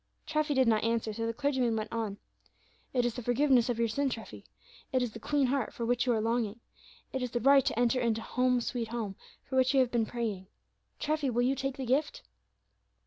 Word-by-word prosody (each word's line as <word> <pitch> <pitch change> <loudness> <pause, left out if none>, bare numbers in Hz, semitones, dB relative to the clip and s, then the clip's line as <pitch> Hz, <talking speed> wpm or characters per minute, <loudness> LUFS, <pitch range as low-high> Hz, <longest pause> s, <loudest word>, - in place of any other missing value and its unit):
Treffy 305 -1 0
did 260 -2 +4
not 220 -2 +3
answer, 230 -1 0
so 230 +1 -2
the - - 0
clergyman 260 -4 +1
went 215 +1 -4
on: 220 -3 -2 0.7
"It 245 -2 +1
is 240 - 0
the 250 - -5
forgiveness 245 0 +3
of 240 - 0
your 230 0 +2
sin, 275 +5 0
Treffy; 200 - -7 0.5
it 255 -1 +2
is 240 - -2
the 225 - -9
clean 285 +5 +1
heart, 260 -1 -1
for 235 - -3
which 245 +2 +1
you 245 - +4
are 225 - +1
longing; 230 -1 -1 0.5
it 265 - -2
is 250 - -1
the 240 - -1
right 275 +3 +6
to 235 - -1
enter 245 +1 +3
into 230 -2 +1
'Home, 250 0 +1
sweet 235 -1 -3
Home,' 220 -4 -4 0.3
for 260 - -3
which 260 +1 +3
you - - +6
have 255 -2 +3
been 230 -2 +1
praying, 215 -6 -3 0.5
Treffy; 305 -2 0
will 245 0 +1
you 260 +2 +3
take 270 +1 -3
the 265 - -4
gift?" 300 - 0
245 Hz, 225 wpm, -30 LUFS, 230-265 Hz, 0.7 s, right